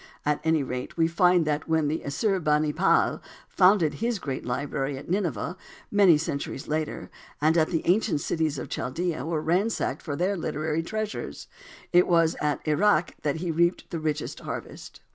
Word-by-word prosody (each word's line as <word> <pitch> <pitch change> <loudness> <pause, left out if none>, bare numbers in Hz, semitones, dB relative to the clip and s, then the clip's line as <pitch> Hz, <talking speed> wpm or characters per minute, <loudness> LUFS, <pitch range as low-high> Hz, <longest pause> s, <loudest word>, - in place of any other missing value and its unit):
At 150 0 +1
any 160 -2 +2
rate, 125 +3 -5
we 165 -1 +4
find 175 0 +3
that 150 +1 -2
when 160 -2 +2
Assur 185 +6 -1
bani 150 -2 +1
pal 180 +5 +2 0.3
founded 180 -5 +4
his 235 0 -1
great 135 -8 -4
library 135 +2 -2
at 140 - -8
Nineveh 180 - -1 0.4
many 195 -6 +6
centuries 140 -3 -4
later, 155 0 -3 0.3
and 155 +2 +3
the 165 0 +1
ancient 185 -2 +2
cities 155 -2 -1
of 125 - -5
Chaldea 155 +4 -3
were 160 0 -2
ransacked 190 +7 0
for 145 -4 -4
their 185 +6 0
literary 155 -2 -2
treasures, 215 +5 -5 0.5
it 175 +1 +6
was 165 -1 +3
at 150 +1 -1
Erech 175 +2 +2
that 145 -2 0
he 170 +1 -2
reaped 170 +2 +2
his 165 -3 -3
richest 155 -1 -2
harvest. - - -8
160 Hz, 160 wpm, -26 LUFS, 150-180 Hz, 0.5 s, many